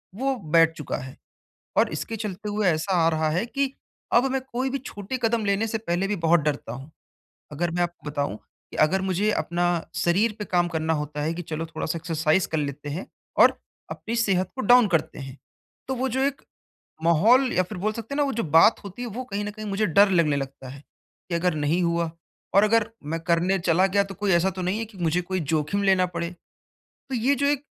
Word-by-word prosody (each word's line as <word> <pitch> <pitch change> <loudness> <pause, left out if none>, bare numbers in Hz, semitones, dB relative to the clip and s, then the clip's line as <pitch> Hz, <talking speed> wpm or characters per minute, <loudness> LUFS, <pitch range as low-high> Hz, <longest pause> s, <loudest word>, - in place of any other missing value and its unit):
वो 265 +4 0
बैठ 165 -5 +3
चुका 150 - -4
है 130 +1 -9 0.6
और - - +4
इसके 225 - -4
चलते 210 -1 -5
हुए 205 -1 +1
ऐसा 165 +3 0
आ - - +6
रहा 160 -1 +1
है 180 +8 0
कि 275 +1 -1 0.4
अब 240 - +5
मैं 265 - 0
कोई 255 +2 -1
भी 275 - -2
छोटे 240 0 -6
कदम 225 -1 +1
लेने 200 +2 +1
से 225 0 -2
पहले 180 -2 -1
भी 210 - 0
बहुत 170 +1 +5
डरता 145 -1 -2
हूँ। 135 +5 -9 0.6
अगर 165 +3 -2
मैं 175 +1 -1
आपको 175 -3 -5
बताऊँ 145 -7 -2 0.3
कि - - -8
अगर 185 +5 +3
मुझे 190 +2 0
अपना 175 -2 -1 0.3
शरीर 195 +6 +2
पे 210 - -3
काम 175 -1 +1
करना 160 -1 -1
होता 150 -1 -3
है 155 +2 -1
कि 175 - -5
चलो 160 -1 -4
थोड़ा-सा 165 0 -4
एक्सरसाइज़ 165 +1 +1
कर 160 - -2
लेते 145 0 -4
हैं 160 +6 -4 0.4
और - - +6 0.3
अपनी 230 - -4
सेहत 190 -5 +1
को 265 - -3
डाउन 245 -2 +6
करते 165 -6 -1
हैं। 135 0 -8 0.5
तो 265 - -1
वो 260 +2 -1
जो 260 +2 -1
एक 275 0 0 0.6
माहौल 225 - +4
या 185 - +3
फिर 185 +1 -8
बोल 210 +4 0
सकते 230 +4 -6
हैं - - -2
ना 295 - +3
वो 275 - -1
जो 230 - -1
बात 165 +7 +5
होती 200 +4 -8
है, 245 - -3
वो 235 +3 -5
कहीं 205 -4 -4
न 205 - -4
कहीं 215 +1 -8
मुझे 200 +2 0
डर 200 +3 +5
लगने 165 -5 +3
लगता 135 -1 -6
है 140 +2 -9 0.5
कि 170 - -1
अगर 175 +1 +1
नहीं 155 +4 +1
हुआ 170 -1 0 0.5
और 200 - +7
अगर 225 +1 +3
मैं 160 +3 -3
करने 170 +3 +1
चला 175 +1 +3
गया, 200 +1 +2
तो 195 0 -8
कोई 205 +1 0
ऐसा 175 +2 +3
तो 190 0 -6
नहीं 185 +4 -1
है 225 - -2
कि 215 -2 -16
मुझे 175 0 +1
कोई 185 +1 -3
जोखिम 160 +5 -1
लेना 190 -2 +4
पड़े। 170 0 -2 0.6
तो 270 - -10
ये 250 +4 +2
जो 280 +1 0
एक 285 0 +1
185 Hz, 225 wpm, -25 LUFS, 165-220 Hz, 0.6 s, और